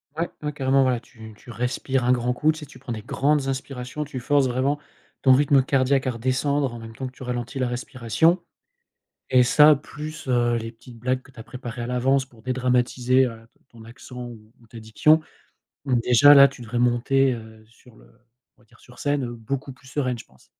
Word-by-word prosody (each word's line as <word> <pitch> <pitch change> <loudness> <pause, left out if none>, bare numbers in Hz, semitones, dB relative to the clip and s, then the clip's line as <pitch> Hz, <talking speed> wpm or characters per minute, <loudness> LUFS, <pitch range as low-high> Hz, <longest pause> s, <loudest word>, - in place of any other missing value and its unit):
Ouais, 165 +2 -2
ouais, 150 0 -3
carrément. 135 -1 +2
Voilà, 130 -2 +2
tu 110 -2 -14
tu 120 - -13
respires 125 +2 -2
un 125 - +2
grand 125 0 +1
coup. 150 +5 +2
Tu 155 - -8
sais, 150 - -8
tu 130 -2 -16
prends 130 -1 -8
des 110 - -6
grandes 140 +3 0
inspirations. 135 +1 -4
Tu 140 -3 -7
forces 140 +2 +2
vraiment 130 +4 0 0.4
ton 130 - +6
rythme 140 0 +4
cardiaque 135 0 +1
à 130 - +1
redescendre 130 +2 -1
en 120 - -8
même 115 0 -10
temps 130 - -5
que 130 - -10
tu 130 - -12
ralentis 125 +1 -4
la 130 - 0
respiration 130 - 0 0.9
et 125 -1 +5
ça, 150 +4 +6
plus, 155 +2 -9
heu, 120 -2 +2
les 115 0 -5
petites 115 0 -15
blagues 130 +2 -1
que 130 - -19
tu 125 - -15
as 110 - -8
préparées 125 -1 -8
à 120 - -4
l'avance 130 +2 +1
pour 120 -4 -21
dédramatiser, 130 0 +1
heu, 115 -2 -8
t - - -35
ton 115 -1 -15
accent 125 +1 -10
ou 110 -2 -13
ou 115 - -21
ta 115 - -11
diction. 130 +9 +3 0.6
Donc 125 -4 +1
déjà, 125 +5 +7
là, 140 -1 +9
tu 125 -2 -12
devrais 120 +1 -4
monter, 130 +2 +2
heu, 110 -2 -9
sur 115 +1 -21
le - - -19 0.5
on - - -25
va - - -25
dire, 110 - -24
sur 125 0 -18
scène, 145 -2 -1
heu, 120 - -5
beaucoup 135 +4 -5
plus 130 +1 -20
sereine, 130 -3 -2
je - - -10
pense. - - -25
125 Hz, 220 wpm, -23 LUFS, 120-135 Hz, 0.9 s, là